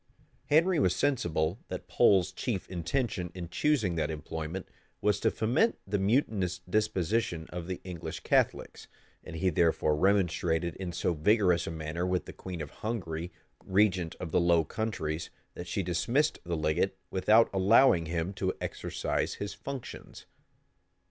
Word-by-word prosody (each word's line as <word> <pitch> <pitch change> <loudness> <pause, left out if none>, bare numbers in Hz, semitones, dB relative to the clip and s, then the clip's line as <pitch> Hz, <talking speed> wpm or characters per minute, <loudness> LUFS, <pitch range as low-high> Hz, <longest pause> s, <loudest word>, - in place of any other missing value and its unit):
Henry 165 +3 +4
was - - +2
sensible 90 - 0
that - - -6
Pole's 95 -2 +4
chief 100 0 -3
intention 90 +1 -2
in 85 -2 -6
choosing 120 - +1
that 80 -1 0
employment, 80 +3 -5 0.3
was 105 -1 +1
to - - +3
foment 130 - +1
the 100 +1 -1
mutinous 95 -4 +1
disposition 95 -2 0
of 90 -1 -5
the 90 -1 -4
English 90 -3 -6
Catholics; - - 0 0.4
and 85 - -9
he 90 +3 +1
therefore 80 -2 +2
remonstrated 85 -2 +1
in 95 -2 -4
so 85 - 0
vigorous 90 +2 +3
a - - -1
manner 80 +2 -3
with 90 -2 0
the - - -9
queen 90 -3 -7
of 70 - -9
Hungary, 90 -7 -4 0.3
regent 95 -4 +2
of 80 - -5
the - - +3
Low 85 -1 +4
Countries, 80 -5 -3 0.2
that 90 - -8
she 95 - -1
dismissed 105 - +1
the 85 -1 -2
legate, 80 +5 0
without 105 +5 +5
allowing 95 -2 +5
him 85 +3 -2
to 95 -1 -2
exercise - - -2
his 100 0 -5
functions. 140 -3 -8
90 Hz, 150 wpm, -30 LUFS, 85-105 Hz, 0.4 s, without